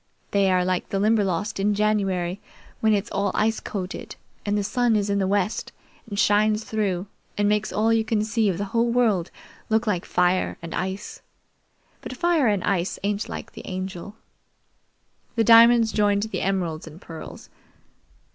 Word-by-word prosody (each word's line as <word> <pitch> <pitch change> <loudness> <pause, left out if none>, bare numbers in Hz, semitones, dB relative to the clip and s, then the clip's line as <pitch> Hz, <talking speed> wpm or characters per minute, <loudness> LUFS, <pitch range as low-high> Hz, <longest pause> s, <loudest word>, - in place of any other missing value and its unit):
They're 190 -3 +3
like 185 -1 -1
the 195 - -1
Limberlost 205 -1 +1
in 205 +1 +1
January, 195 -4 0 0.4
when 220 - +3
it's 205 +3 -3
all 200 0 0
ice 220 +1 +1
coated, 190 0 -6 0.3
and 205 0 0
the 205 - 0
sun 240 +2 +1
is 205 -1 0
in 200 - +1
the 190 - +1
west 200 +2 -1 0.4
and 200 - -5
shines 210 +1 +3
through 200 -5 -1 0.3
and 205 0 +2
makes 210 0 +1
all 225 +2 +2
you 225 -1 +2
can 220 -1 0
see 215 0 +1
of 180 - -1
the 200 - -2
whole 235 0 +2
world 220 -8 +2 0.4
look 220 +1 +2
like 185 -5 0
fire 180 +1 +1
and 165 -1 -8
ice; 190 +2 -4 0.8
but 255 - -7
fire 340 -5 +2
and 205 -3 +1
ice 190 -2 0
ain't 205 +1 -1
like - - -7
the - - -11
Angel." 185 +1 -6 1.2
The 230 - +3
diamonds 230 0 +7
joined 205 -1 +2
the 220 - -3
emeralds 175 -5 -2
and 160 +2 -11
pearls. 165 -4 -10
205 Hz, 165 wpm, -24 LUFS, 190-220 Hz, 1.2 s, diamonds